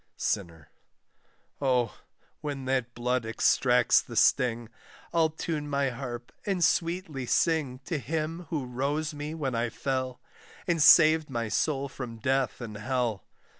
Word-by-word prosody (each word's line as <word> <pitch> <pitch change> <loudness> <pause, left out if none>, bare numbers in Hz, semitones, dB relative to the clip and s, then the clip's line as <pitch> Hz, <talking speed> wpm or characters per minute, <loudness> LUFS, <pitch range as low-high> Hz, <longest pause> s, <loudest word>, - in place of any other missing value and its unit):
SINNER. 85 -7 -3 0.9
Oh, 125 -4 +1 0.4
when 145 -3 -5
that 130 -2 -1
blood 125 +1 0
extracts 120 +2 +3
the - - -10
sting, 120 -3 +3 0.4
I'll 165 -2 +3
tune 155 -1 -4
my 140 -2 +1
harp 120 -1 -6
and 190 -4 0
sweetly 165 -7 0
sing 145 -6 +1
To 165 - -2
Him 160 +3 -3
who 150 -5 -2
rose 145 +5 -2
me 150 +2 -5
when 140 -5 -2
I 115 0 0
fell, 130 0 -3 0.5
And 170 -3 +1
saved 155 0 +7
my 115 -4 -2
soul 140 +3 0
from 125 -4 -7
death 135 +1 0
and 110 -3 -6
hell. 120 -3 -1
135 Hz, 135 wpm, -28 LUFS, 120-155 Hz, 0.9 s, saved